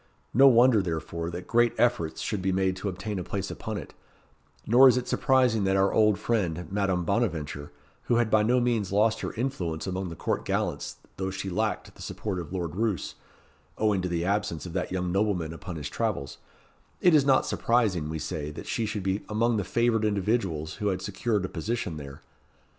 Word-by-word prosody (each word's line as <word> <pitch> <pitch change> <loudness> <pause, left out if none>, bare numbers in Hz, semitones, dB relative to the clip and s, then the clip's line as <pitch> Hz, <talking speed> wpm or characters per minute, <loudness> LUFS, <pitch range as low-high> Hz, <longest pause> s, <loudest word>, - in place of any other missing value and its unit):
No 135 +4 +7
wonder, 120 -3 +6
therefore, 85 -1 -3
that 90 +1 -6
great 120 0 +3
efforts 120 -10 +1
should 105 -3 -2
be 95 +1 0
made 95 0 +1
to 100 +2 -3
obtain 95 +2 -4
a - - -3
place 95 +2 -4
upon - - -5
it, - - -8 0.7
nor 125 +4 +7
is 125 -1 +5
it 125 - -2
surprising 125 -5 +3
that 95 0 +2
our 95 0 +3
old 105 -3 +4
friend, 90 -8 -1
Madame 95 -3 0
Bonaventure, 80 -9 -1 0.3
who 120 - +2
had 115 -2 +2
by 110 - +5
no 120 +4 +3
means 115 -6 0
lost 110 +3 +2
her - - -3
influence 100 -11 -3
among 95 -1 -3
the 85 - -7
court - - -2
gallants, - - -2 0.2
though 95 0 -2
she 95 0 -4
lacked, 110 +4 -2
the - - -15
support 100 -4 -4
of 85 -3 -7
Lord 85 -4 -3
Roos, 105 -4 -1 0.6
owing 105 -3 +2
to 90 - -2
the 85 0 -1
absence 100 -4 -1
of 85 - -7
that 90 -1 -2
young 90 -1 -1
nobleman 95 -5 0
upon 85 +2 -7
his 75 -2 -4
travels, 100 -12 -3 0.6
it 180 - +5
is 150 -3 +6
not 135 -1 +4
surprising, 105 -10 +1
we 80 - -3
say, 75 0 -4
that 75 - -8
she 115 -2 -1
should 105 -2 -3
be 95 +2 0
among 115 +2 +1
the 100 - 0
favoured 115 +3 +1
individuals 100 -6 -1
who 105 -1 -2
had 95 -2 -1
secured 105 0 -1
a - - -2
position 90 -1 -3
there. 70 -2 -9
100 Hz, 200 wpm, -27 LUFS, 90-115 Hz, 0.7 s, No